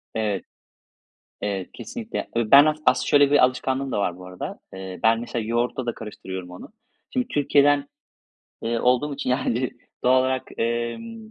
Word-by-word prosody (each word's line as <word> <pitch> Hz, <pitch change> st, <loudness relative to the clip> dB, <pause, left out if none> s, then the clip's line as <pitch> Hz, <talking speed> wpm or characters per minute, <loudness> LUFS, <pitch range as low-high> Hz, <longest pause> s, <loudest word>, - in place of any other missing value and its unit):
Evet. 105 Hz, -4 st, -1 dB, 1.0 s
Evet 100 Hz, -2 st, -3 dB
kesinlikle. 235 Hz, -2 st, -6 dB, 0.2 s
E, 115 Hz, -2 st, 0 dB
ben 140 Hz, +2 st, +10 dB
as 155 Hz, 0 st, +2 dB
aslında -, -, +3 dB
şöyle 145 Hz, -1 st, +5 dB
bir 145 Hz, -3 st, +6 dB
alışkanlığım 130 Hz, +1 st, -1 dB
da -, -, 0 dB
var 90 Hz, -4 st, 0 dB
bu 90 Hz, 0 st, -11 dB
arada. 90 Hz, 0 st, -6 dB, 0.2 s
Eee, 95 Hz, -1 st, -7 dB
ben 115 Hz, 0 st, +4 dB
mesela 120 Hz, -1 st, -3 dB
yoğurtla 120 Hz, +2 st, -1 dB
da 120 Hz, -, -1 dB
karıştırıyorum 95 Hz, -4 st, -7 dB
onu. 90 Hz, -, -10 dB, 0.4 s
Şimdi 255 Hz, -1 st, -1 dB
Türkiye'den, 145 Hz, 0 st, +3 dB, 0.7 s
eee, 115 Hz, 0 st, 0 dB
olduğum 125 Hz, +5 st, +2 dB
için 135 Hz, -2 st, -3 dB
yani 125 Hz, -1 st, 0 dB, 0.3 s
doğal 130 Hz, +1 st, +5 dB
olarak, 130 Hz, 0 st, 0 dB, 0.2 s
emm. 120 Hz, -, -3 dB
125 Hz, 160 wpm, -24 LUFS, 110-140 Hz, 1.0 s, ben